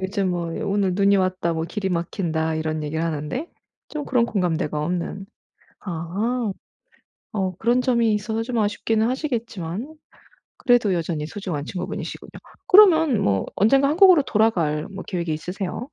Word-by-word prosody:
요즘 190 0 -1
뭐 175 -1 -2 0.2
'오늘 200 -2 +1
눈이 200 +1 +4
왔다." 185 -2 0
뭐 160 0 -2
"길이 190 +3 -3
막힌다." 165 -2 -1
이런 155 0 -2
얘기를 155 +2 -2
하는데 165 - -3 0.4
좀 300 -1 -5
그런 245 -4 +2
공감대가 175 -7 -1
없는 180 +4 -3 0.6
아. 200 +7 -2 0.8
어 190 -3 -1
그런 240 +2 +2
점이 235 -4 +2
있어서 220 +2 -2
좀 240 0 -3
아쉽기는 220 +1 +1
하시겠지만 235 - -3 0.6
그래도 245 -5 +3
여전히 165 -3 -2
소중한 170 -6 -5
친구분이시군요. 185 +1 -6 0.4
그러면 325 - +6
뭐 95 -1 +1
언젠가 270 +7 +4
한국으로 355 -1 +6
돌아갈 180 - +1
뭐 195 -1 -7
계획이 170 -4 -2
있으세요? 180 +7 -4
195 Hz, 335 characters per minute, -23 LUFS, 170-235 Hz, 0.8 s, 그러면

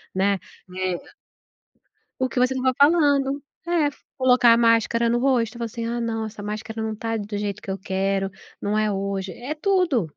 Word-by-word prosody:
né, 195 0 +2 0.4
é 185 -1 -1 1.2
O 260 0 +1
que 250 - -2
você 255 +1 +3
estava 260 0 +1
falando, 285 -3 +4 0.3
é, 330 -4 +2 0.3
colocar 250 -2 +6
a - - +4
máscara 230 0 +3
no 240 - +2
rosto 245 -3 +1
e - - -8
falar 235 - -2
assim, 230 +1 -5
ah 235 +1 -2
não, 225 -1 -2
essa 210 -1 -8
máscara 220 +2 -5
não 220 0 -2
está 225 +1 -3
do 205 0 -4
jeito 205 0 -3
que 195 - -5
eu 195 - -3
quero, 195 0 -1 0.3
não 210 +1 0
é 215 -1 +2
hoje, 195 -1 -2
é 265 - -5
tudo. 315 - +1
230 Hz, 190 wpm, -24 LUFS, 205-255 Hz, 1.2 s, colocar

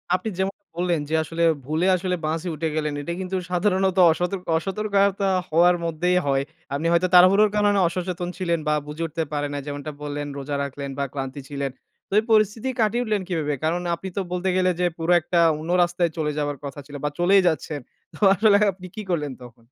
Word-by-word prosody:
আপনি 185 +4 -3
যেমন 195 +1 0 0.2
বললেন 175 -2 0
যে - - -3
আসলে 165 +2 -2 0.2
ভুলে 160 +5 0
আসলে 180 0 -1
বাসে 160 +3 -2
উঠে 160 +1 -2
গেলেন। 150 -1 -1
এটা 170 +4 -4
কিন্তু 190 +1 -3 0.2
সাধারণত 190 0 +1
অসত 175 +3 -1 0.3
অসতর্কতা 200 +1 +1 0.2
হওয়ার 175 +3 +5
মধ্যেই 180 +3 +1
হয়। 135 0 +2 0.3
আপনি 155 +4 -1
হয়তো 170 +2 +3
তারাহুড়োর 195 +4 +7
কারণে 205 -1 +3
অসচেতন 180 0 -3
ছিলেন 170 -3 0
বা 150 - +3
বুঝে 155 +3 -5
উঠতে 160 +1 -3
পারে 145 0 -1
নাই 145 - -3
যেমনটা 145 +1 -5
বললেন 145 0 -4
রোজা 140 +1 -4
রাখলেন 140 0 -5
বা - - +1
ক্লান্তি 135 0 -5
ছিলেন। 140 -2 -3 0.4
তো - - -7
এই - - -2
পরিস্থিতি 215 +3 +2
কাটিয়ে 230 +2 +2
উঠলেন 215 -4 0
কিভাবে 155 -5 -1
কারণ 170 +3 0
আপনি 190 +2 -7
তো - - +2
বলতে 180 +1 -1
গেলে 185 0 +3
যে 180 - +2
পুরো 165 +1 -1
একটা 170 +1 0 0.2
অন্য 160 - -7
রাস্তায় 175 -1 0
চলে 150 -1 0
যাবার 145 -1 -2
কথা 140 +1 -7
ছিল 145 0 -11
বা 150 - +1
চলেই 190 +3 +5
যাচ্ছেন। 155 -2 -1 0.3
তো - - -13 0.2
আসলে 205 +1 +5
আপনি 185 0 -11
কি 215 - -4
করলেন 150 -6 -1
তখন? 115 -1 -14
175 Hz, 200 wpm, -23 LUFS, 150-190 Hz, 0.4 s, তারাহুড়োর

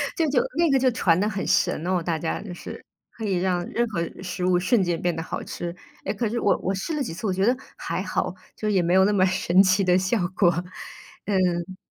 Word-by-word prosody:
就 330 - +1
就 255 -3 +3 0.2
那 335 -3 +3
个 270 - +4
就 260 0 +4
传 170 -7 +2
得 205 - +1
很 195 -2 -3
神 165 - +1
哦 180 -1 +1
大 165 -1 -1
家 160 +1 -3
就 195 -4 -7
是， - - -9 0.4
可 225 - -4
以 195 -3 0
让 180 -1 0
任 240 +1 +1
何 170 -5 -2 0.2
食 180 0 -3
物 180 -1 +3
瞬 195 +4 +2
间 175 -2 0
变 175 -1 +1
得 165 - -4
好 165 - -5
吃， 175 0 -5 0.3
哎， 200 - -1
可 215 +1 -1
是 235 - -2
我 205 - +2
我 190 - 0
试 250 - -3
了 285 - -1
几 165 - -5
次， 215 +5 -4
我 190 - +1
觉 190 +2 +1
得 245 +2 +3 0.2
还 - - -3
好， - - -2 0.2
就 215 - -4
是 - - +2
也 185 - +3
没 175 +1 +1
有 190 0 +6
那 210 - +3
么 185 -2 +4
神 185 0 +3
奇 190 +1 +3
的 180 0 +4
效 190 +5 +1 0.2
果， 175 -4 +5 0.8
嗯。 185 -2 0
190 Hz, 270 characters per minute, -24 LUFS, 175-210 Hz, 0.8 s, 有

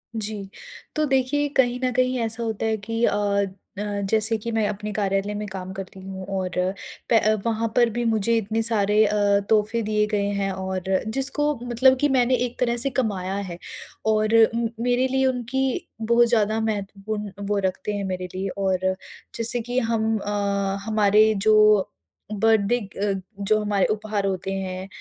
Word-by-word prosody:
जी। 210 -2 -4 0.5
तो 305 0 +2
देखिए 270 +2 +1
कहीं 250 -1 +3
न 255 - +2
कहीं 255 0 +1
ऐसा 230 0 -2
होता 220 -1 -2
है 220 0 +1
कि 225 +3 -3
अ - - -1 0.6
अ, - - -1 0.3
जैसे 220 0 +2
कि 230 +2 -5
मैं 220 -2 +1
अपने 210 +1 -4
कार्यालय 200 0 -1
में 210 0 -4
काम 190 -1 -6
करती 190 0 -8
हूँ 190 0 -7
और 185 -1 -4 0.5
प 215 -1 +4
वहाँ 225 0 0
पर 240 -1 +4
भी 240 +2 -2
मुझे 225 0 +2
इतने 225 +1 -1
सारे 210 -1 +3
अ, 210 - 0 0.3
तोहफे 220 +1 +2
दिए 210 0 +1
गए 205 -1 0
हैं 195 -1 0
और 190 -1 -4 0.2
जिसको 285 +5 0
मतलब 250 +2 +4
कि 290 +1 +2
मैंने 255 -1 +3
एक 245 - -8
तरह 240 -1 +1
से 240 +4 +6
कमाया 200 -8 -2
है। 185 -4 -5 0.5
और 215 0 +2
उम, 230 0 +1
मेरे 245 +2 +2
लिए 265 0 +1
उनकी 260 +1 -1
बहुत 235 +2 +4
ज़्यादा 220 -1 +2
महत्वपूर्ण 210 -1 -3 0.2
वो 205 -1 0
रखते 190 +3 -2
हैं 200 -1 -3
मेरे 185 -1 -3
लिए, 195 +1 -2
और 190 -2 +1 0.6
जैसे 235 +1 -1
कि 245 +2 -1
हम 225 -1 0
अ, 200 -1 -1
हमारे 215 0 +4
जो 215 -2 +5 0.4
बर्थडे 220 +2 +2
ग - - -14
अ, 200 0 -3
जो 215 +2 +2
हमारे 205 -2 +1
उपहार 210 -1 -2
होते 190 0 -3
हैं, 190 0 -4
215 Hz, 175 wpm, -24 LUFS, 200-235 Hz, 0.6 s, से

